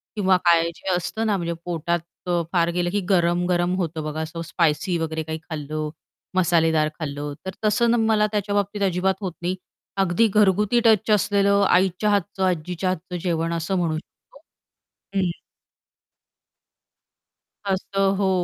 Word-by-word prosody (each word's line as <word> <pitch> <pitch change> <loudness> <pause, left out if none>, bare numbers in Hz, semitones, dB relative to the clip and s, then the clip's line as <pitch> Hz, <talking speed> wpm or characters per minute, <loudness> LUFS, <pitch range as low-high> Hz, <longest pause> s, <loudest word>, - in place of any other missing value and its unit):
किंवा 190 -3 +3
काय 170 -1 +6
जे 190 - -6
असतं 220 +5 -2
ना, 205 - +2
म्हणजे 170 -1 -2
पोटात 170 0 -1 0.3
अ, 175 -1 +1
फार 170 -1 +3
गेलं 175 0 0
की 205 - +1
गरम-गरम 175 0 +2
होतं 165 -4 -2
बघा 155 +1 -3
असं 160 +1 -5
स्पायसी 170 +1 +1
वगैरे 160 -1 -2
काही 160 0 -4
खाल्लं, 155 -1 -4 0.5
मसालेदार 165 -4 +3
खाल्लं. 145 -1 -4
तर 190 - -3
तसं 235 +3 +3
मला 215 -1 +3
त्याच्याबाबतीत 205 0 -1
अजिबात 190 0 +1
होत 185 -4 -3
नाही, 180 +2 -1 0.5
अगदी 190 +5 +3
घरगुती 210 +2 +3
टच 220 -1 +4
असलेलं 200 0 +2
आईच्या 185 +3 +2
हातचं, 200 -1 0
आजीच्या 180 +1 -1
हातचं 180 0 -4
जेवण 165 -1 0
असं 170 +3 -1
म्हणू 165 -3 0
शकतो. 175 - -15 0.8
हं. 185 -2 +1 2.4
असं. 195 0 +1
हो. 195 -1 +1
180 Hz, 140 wpm, -23 LUFS, 165-195 Hz, 2.4 s, काय